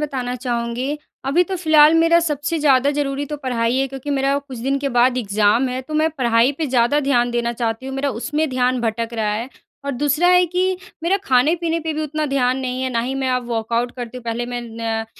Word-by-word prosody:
बताना 255 -4 -3
चाहूँगी। 245 +3 -2 0.3
अभी 300 +7 +3
तो 380 0 -4
फ़िलहाल 315 -2 +5
मेरा 330 +1 +5
सबसे 305 0 -1
ज़्यादा 280 -2 +3
ज़रूरी 285 -1 -2
तो 300 - -5
पढ़ाई 245 -3 -1
है 270 - +1
क्योंकि 270 +2 -6
मेरा 275 0 +1
कुछ 270 -4 -10
दिन 270 +3 -1
के 280 0 -2
बाद 245 0 +3
एग्ज़ाम 215 +3 +2
है 255 +1 -3
तो 305 +4 -8
मैं 315 +1 +2
पढ़ाई 235 +2 +3
पे 315 - -1
ज़्यादा 255 +3 +2
ध्यान 245 -4 +1
देना 235 0 -1
चाहती 230 +1 -3
हूँ 270 - -5
मेरा 275 +1 -1
उसमें 295 +6 -2
ध्यान 255 -1 +1
भटक 230 0 -2
रहा 215 -2 0
है। 230 +4 -3 0.4
और 280 - -1
दूसरा 295 +7 +1
है 360 0 +5
कि 360 +2 -1 0.4
मेरा 370 +4 +2
खाने-पीने 320 +6 +2
पे 320 0 -3
भी 310 +1 -3
उतना 305 +1 -2
ध्यान 260 -2 +1
नहीं 255 0 -3
है। 260 - 0
ना 235 - 0
ही 255 +3 -3
मैं 270 -1 -1
अब 250 -1 0
वर्कऑउट 230 +1 -1
करती 245 0 -6
हूँ 250 - -8
पहले 235 +1 -3
मैं 245 0 -4
न 225 -1 -3
260 Hz, 225 wpm, -20 LUFS, 240-295 Hz, 0.4 s, फ़िलहाल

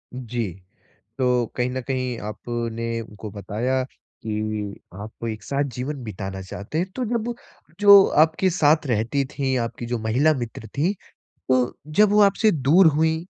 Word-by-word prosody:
जी, 120 -5 -3 0.7
तो 125 -2 +2
कहीं 125 0 0
न 130 +1 -3
कहीं 130 -3 -2
आपने 115 0 -4
उनको 105 -1 -9
बताया 110 +6 -2
कि 105 -2 -5 0.3
आप 110 +2 -9
एक 110 -1 -5
साथ 140 +5 -1
जीवन 130 +1 -4
बिताना 95 -2 -6
चाहते 100 +10 -6
हैं, 180 - +1
तो 255 - -1
जब 235 +1 -2 0.5
जो 200 -1 +9 0.2
आपके 160 +4 +2
साथ 155 -3 +3
रहती 120 +3 0
थीं, 135 -1 -2
आपकी 115 0 -4
जो 120 0 -2
महिला 120 +8 +2
मित्र 120 -3 -6
थीं, 165 +7 +2 0.6
तो 130 -1 +1
जब 200 +7 +3
वो 210 - +5
आपसे 205 +2 +4
दूर 160 +5 +4
हुईं, 160 +1 +1
125 Hz, 150 wpm, -23 LUFS, 110-155 Hz, 0.7 s, जो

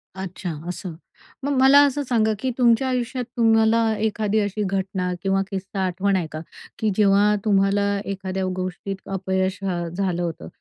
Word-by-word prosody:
अच्छा. 190 -1 -5 0.2
असं. 180 -1 -5 0.5
मग 285 - -1
मला 270 +2 +8
असं 285 +1 -1
सांगा, 225 -4 +1
की 260 - -1
तुमच्या 240 0 +3
आयुष्यात 255 0 -2
तुम्हाला 225 -1 +4 0.2
एखादी 215 0 0
अशी 205 0 -1
घटना 190 -1 -2
किंवा 195 0 +2
किस्सा 195 0 -3
आठवण 190 +2 0
आहे 175 -4 -1
का, 155 - -5 0.4
की 220 - +1
जेव्हा 205 0 +4
तुम्हाला 200 0 +2 0.2
एखाद्या 190 -1 -3
गोष्टीत 185 +1 -4 0.2
अपयश, 190 0 -1
अ, 175 -3 -2
झालं 185 -2 -1
होतं? 165 - -5
195 Hz, 155 wpm, -23 LUFS, 190-220 Hz, 0.5 s, मला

